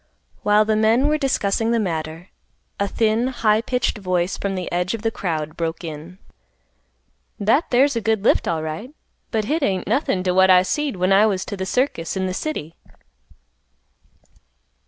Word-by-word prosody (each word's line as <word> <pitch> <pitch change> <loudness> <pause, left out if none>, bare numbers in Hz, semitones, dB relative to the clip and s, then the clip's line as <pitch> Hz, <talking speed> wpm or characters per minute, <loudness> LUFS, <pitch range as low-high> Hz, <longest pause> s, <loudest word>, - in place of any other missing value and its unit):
While 210 +1 +4
the 215 0 +1
men 225 +6 +3
were 305 0 +1
discussing 225 -5 0
the 235 0 +2
matter, 165 -3 -4 0.5
a 200 - +1
thin, 225 +4 +1
high 220 -4 +1
pitched 250 -2 -1
voice 185 -1 -1
from 195 -1 -3
the 185 -1 -4
edge 180 +4 -1
of 225 - -9
the 225 - +1
crowd, 155 -6 -3
broke 165 0 -3
in, 160 +3 -8 1.2
"That 220 +10 +2
there's 265 +2 +3
a 230 - -1
good 220 -1 0
lift - - +3
alright, 160 - -4 0.3
but 220 -2 -1
hit 310 +8 -1
ain't 190 -8 0
nothin' 195 -9 0
t' 185 - +1
what 190 +1 +4
I 180 -1 +7
seed 290 +7 -2
when 185 +1 +2
I 205 +3 +5
was 190 -3 -1
t' - - -5
th' 190 -1 -4
circus 200 - -1
in 190 - -1
th' 185 - -3
city." 165 - -4
200 Hz, 175 wpm, -21 LUFS, 180-230 Hz, 1.2 s, I